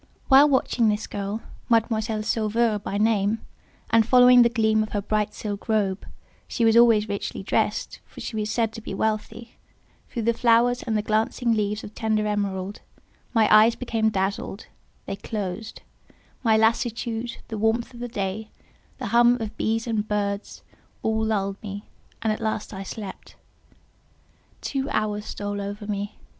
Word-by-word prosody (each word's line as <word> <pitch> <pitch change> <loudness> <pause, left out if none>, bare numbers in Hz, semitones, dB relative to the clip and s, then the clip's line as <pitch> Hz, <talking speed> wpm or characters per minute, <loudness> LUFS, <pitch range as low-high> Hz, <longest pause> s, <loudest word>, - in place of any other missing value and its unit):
While 280 +2 +8
watching 250 -4 +2
this 210 0 -1
girl, 205 +2 -4 0.3
Mademoiselle 220 -1 +1
Sauveur 220 0 +1
by 200 0 -4
name, 210 0 +2 0.5
and 230 0 +6
following 250 +1 +7
the 235 - +5
gleam 220 -2 +2
of 215 - -4
her 205 - 0
bright 210 0 -1
silk 205 0 -6
robe 200 -3 0 0.4
(she 235 - 0
was 225 0 +4
always 230 -3 +6
richly 200 -1 -4
dressed, - - -1
for - - -13
she 225 - -5
was 215 -1 -2
said 225 0 0
to 225 - -8
be - - -6
wealthy) 220 +2 -3 0.5
through 235 - -4
the 235 +1 +2
flowers 235 +1 +3
and 220 -3 -1
the 210 - -1
glancing 220 +3 0
leaves 210 0 -1
of 210 - -9
tender 215 -1 0
emerald, 200 -2 -2 0.5
my 225 -3 +4
eyes 220 +2 +6
became 225 -3 0
dazzled—they 195 0 -5
closed; 210 0 -5 0.6
my 220 -2 +4
lassitude, 230 +1 0
the 220 - -4
warmth 225 +3 0
of 240 - -11
the 245 - -4
day, 210 0 -4 0.5
the 250 -5 -4
hum 240 +1 +6
of 220 -2 -5
bees 225 +1 -1
and 220 -3 -1
birds, 200 -1 -3 0.4
all 220 0 +1
lulled 200 -2 -1
me, 205 -1 -6 0.4
and 220 -1 +2
at 215 - -6
last 220 -1 -2
I 190 - -6
slept. 195 0 -8 1.3
Two 270 0 -2
hours 210 -1 -1
stole 205 0 -4
over 205 +1 -6
me. 205 0 -4
220 Hz, 160 wpm, -24 LUFS, 205-230 Hz, 1.3 s, While